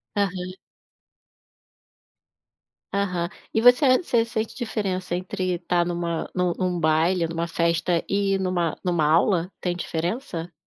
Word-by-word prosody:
Aham. 185 -3 -1 2.4
Aham. 180 -4 -1 0.3
E 220 - +2
você 250 +2 +6
você 235 -8 +2
sente 220 -1 -3
diferença, 195 -7 -2
entre 185 0 -2
estar 175 0 0
numa 170 -1 -2
num 180 -1 +1
num 180 -2 -1
baile, 165 +3 +2
ou - - -5
em - - -5
uma 170 +1 -2
festa 170 0 +1
e 200 0 +1
numa 180 -3 0
numa 175 -3 +1
aula? 170 +3 +3
Tem 180 -1 -1
diferença? 175 +1 -3
180 Hz, 130 wpm, -24 LUFS, 170-200 Hz, 2.4 s, você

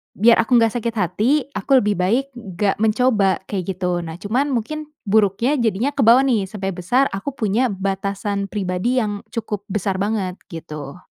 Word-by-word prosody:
biar 230 +4 +5
aku 235 +2 +3
gak 230 -2 +4
sakit 230 0 -3
hati, 215 - +1
aku 270 -2 +2
lebih 205 -3 0
baik 230 +9 +2 0.3
gak 200 +2 0
mencoba. 215 -3 +2
Kayak 195 -3 -2
gitu. 180 -1 -1
Nah 160 -1 -6
cuman 245 +8 0
mungkin 300 +6 -3 0.2
buruknya 220 +6 +2
jadinya 235 +3 +1
kebawa 255 -3 +5
nih. 235 -7 +1
Sampai 195 -1 -4
besar 195 +10 +1
aku 200 +9 -4
punya 225 +3 +1
batasan 200 0 -2
pribadi 195 +4 -1
yang 205 -2 -2
cukup 210 -3 -4
besar 195 -1 -2
banget, 195 -3 -2
gitu. 155 -1 -8
210 Hz, 160 wpm, -20 LUFS, 190-235 Hz, 0.3 s, biar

